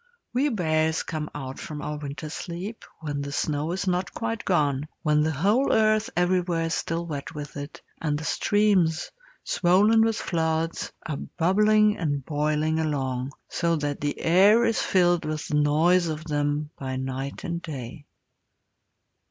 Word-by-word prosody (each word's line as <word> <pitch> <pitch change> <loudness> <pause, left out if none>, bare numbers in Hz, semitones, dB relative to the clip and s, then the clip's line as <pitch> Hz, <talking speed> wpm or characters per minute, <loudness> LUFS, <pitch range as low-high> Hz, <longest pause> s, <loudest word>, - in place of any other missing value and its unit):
We 270 +4 +2
bears 160 - +1
come 155 -1 -4
out 135 -2 -6
from 150 -1 -6
our 150 - -3
winter 145 +1 -6
sleep 180 +7 -6 0.2
when 145 -2 -3
the 140 0 -5
snow 150 +2 -1
is 185 +2 -2
not 180 -2 -1
quite 225 -1 -3
gone, 145 -5 +1 0.2
when 150 -2 +3
the 155 - +2
whole 205 - +2
earth 215 0 +3
everywhere 175 -1 +1
is 165 - -1
still 165 +1 -2
wet 150 0 -6
with 150 0 -7
it, 145 +1 -8 0.2
and 150 -2 0
the 155 - -6
streams, 190 -4 +2 0.3
swollen 205 +6 +4
with 225 0 +3
floods, 165 -2 -1
are 150 -3 -3
bubbling 210 +4 +3
and 145 -5 -1
boiling 155 +1 0
along 135 -4 -2
so 170 -1 0
that 145 -2 -3
the 145 0 -2
air 200 +7 +5
is 230 -1 +1
filled 175 -2 +3
with 155 0 -3
the 150 - +1
noise 170 +4 +3
of 155 -1 -4
them 145 -1 -1
by 130 -1 -3
night 130 +1 -4
and 170 -2 -3
day. 140 -3 -7
160 Hz, 160 wpm, -26 LUFS, 145-180 Hz, 0.3 s, air